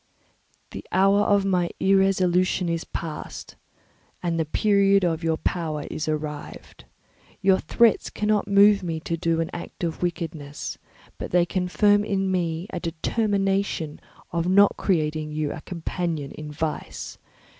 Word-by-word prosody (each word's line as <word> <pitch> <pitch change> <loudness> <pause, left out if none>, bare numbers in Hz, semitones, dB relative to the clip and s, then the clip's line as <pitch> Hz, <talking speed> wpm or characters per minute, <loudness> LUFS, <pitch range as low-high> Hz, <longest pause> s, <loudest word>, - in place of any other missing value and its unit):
"The - - -7
hour 195 +2 +4
of 200 -1 +3
my 180 -3 +1
irresolution 185 -2 +2
is 165 0 -2
past, 155 -3 -6 0.7
and 170 -1 0
the 160 - +1
period 200 +3 +3
of 165 -1 0
your 160 -1 +1
power 155 -4 -2
is 155 - -3
arrived. 150 -1 -5 0.6
Your 190 -1 +5
threats 230 +7 +3
cannot 210 -1 0
move 200 0 +6
me 165 -3 -3
to 165 - -2
do 165 0 0
an 165 - -3
act 175 - -8
of 165 -2 -2
wickedness; 160 -4 -4 0.4
but - - -5
they 175 0 +3
confirm 195 +3 +2
me 190 -5 -1
in 210 - -9
a - - -2
determination 195 -1 -1 0.3
of 170 0 -1
not 200 +2 +5
creating 155 -4 -1
you 150 -1 -1
a 160 - -8
companion 165 -4 -4
in 150 -1 -8
vice. 155 +1 -4
175 Hz, 140 wpm, -24 LUFS, 160-195 Hz, 0.7 s, move